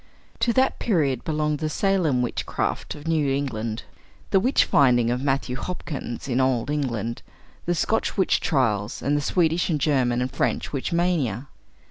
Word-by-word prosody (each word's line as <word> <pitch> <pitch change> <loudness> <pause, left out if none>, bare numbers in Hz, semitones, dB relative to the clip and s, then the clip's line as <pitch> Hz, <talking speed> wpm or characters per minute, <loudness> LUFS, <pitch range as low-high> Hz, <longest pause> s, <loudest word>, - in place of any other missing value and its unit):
To 240 - +2
that 260 +1 +2
period 145 - +1
belonged 150 -1 -1
the 155 - -1
Salem 165 -9 +1
witchcraft 120 - -2
of 145 +1 -10
New 155 -4 +1
England, 115 -5 -2 0.5
the 195 - +5
witch 255 +8 +3
finding 120 -4 +4
of 125 +1 -1
Matthew 135 -2 0
Hopkins 140 -6 -5
in 130 0 +1
Old 130 0 +1
England, 120 -6 -2 0.5
the 175 - +2
Scotch 220 +8 0
witch 190 - +3
trials, 115 - 0
and 145 +3 +1
the 145 - +1
Swedish 165 +3 +1
and 155 -3 +1
German 130 -5 +2
and 125 +1 -1
French - - -1
witch 135 - -2
mania. 150 - 0
140 Hz, 160 wpm, -24 LUFS, 125-165 Hz, 0.5 s, the